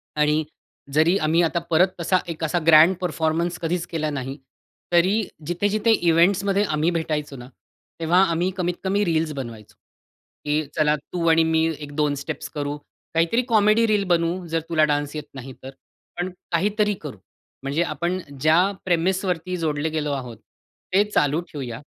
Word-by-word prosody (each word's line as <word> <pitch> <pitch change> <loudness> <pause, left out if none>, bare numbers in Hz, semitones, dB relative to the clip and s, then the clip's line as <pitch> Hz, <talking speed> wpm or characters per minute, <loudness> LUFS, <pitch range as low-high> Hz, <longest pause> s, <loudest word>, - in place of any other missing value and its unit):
आणि 150 +1 +2 0.5
जरी 160 +5 +4
आम्ही 160 0 +2
आता 170 +1 +1
परत 170 +4 +5
तसा 180 +2 +2
एक 165 -1 -5
असा 160 +2 +1
ग्रँड 165 +3 +7
परफॉर्मन्स 170 0 -1
कधीच 170 +1 -2
केला 155 -2 -2
नाही, 135 -1 -5 0.6
तरी 185 +6 +4 0.3
जिथे-जिथे 205 +5 +1
इव्हेंट्समध्ये 195 +2 +3
आम्ही 155 -3 0
भेटायचो 155 -4 -2
ना, 125 0 -10 0.5
तेव्हा 170 +3 +3
आम्ही 170 +3 0
कमीत 175 -1 -1
कमी 200 +2 +1
रील्स 160 -2 0
बनवायचो. 115 -6 -8 0.7
की 150 +1 +1
चला 150 -1 +3
तू 165 +4 -5
आणि 165 0 +5
मी 160 0 +2
एक 145 -1 -8
2 150 -1 +1
स्टेप्स 140 +1 -6
करू, 145 0 -3 0.4
काहीतरी 165 +9 +2
कॉमेडी 215 0 +4
रील 210 -2 +2
बनवू, 175 +1 +1
जर 165 0 0
तुला 160 -2 +3
डान्स 145 0 -2
येत 150 - -4
नाही 135 -1 -8
तर, 130 - -7 0.5
पण 175 +1 -2 0.2
काहीतरी 210 +4 +1
करू. 145 -8 -7 0.5
म्हणजे 140 +5 0
आपण 175 +1 -2 0.2
ज्या 165 +6 +4
प्रेमिसवरती 180 0 0
जोडले 155 -2 -1
गेलो 155 -2 -2
आहोत 125 -4 -6 0.6
ते 195 +2 +5
चालू 150 -6 +2
ठेवूया 125 -4 -6
165 Hz, 155 wpm, -23 LUFS, 150-180 Hz, 0.7 s, ग्रँड